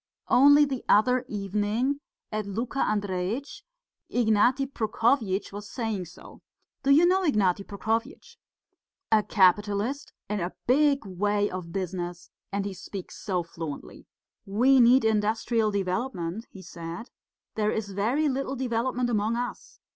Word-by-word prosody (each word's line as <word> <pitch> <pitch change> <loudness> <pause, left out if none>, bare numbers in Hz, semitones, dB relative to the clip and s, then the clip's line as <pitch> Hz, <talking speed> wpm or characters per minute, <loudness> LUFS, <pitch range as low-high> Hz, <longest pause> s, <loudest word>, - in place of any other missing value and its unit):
Only 285 +3 +7
the 270 -3 -4
other 250 +4 +4
evening, 210 +7 -1 0.3
at 215 -1 -3
Luka 230 +7 -3
Andreitch's, 205 +5 -2 0.5
Ignaty 240 +3 +3
Prokofyitch 225 -5 0
was 205 0 -7
saying 220 -6 -3
so. 175 - -14 0.4
Do 275 - -1
you 300 +5 +7
know 370 +2 +3
Ignaty 205 - +2
Prokofyitch? 225 - -3 0.7
A 220 -1 +5
capitalist, 205 +7 +1 0.2
in 210 0 -2
a 175 0 -3
big 280 0 +3
way 205 +2 0
of 180 -2 -6
business, 175 -2 -5 0.2
and 200 0 -2
he 200 - -4
speaks 190 +1 -8
so 185 -4 -2
fluently. 165 -3 -8 0.4
'We 250 +7 +4
need 245 0 +6
industrial 220 +1 +1
development,' 195 0 -3
he 190 - -12
said; 170 +7 -8 0.4
'there 210 -1 0
is 215 -2 -3
very 235 +11 +1
little 270 0 -2
development 250 0 -1
among 215 +1 +1
us. 245 +1 -5
215 Hz, 130 wpm, -27 LUFS, 195-250 Hz, 0.7 s, Only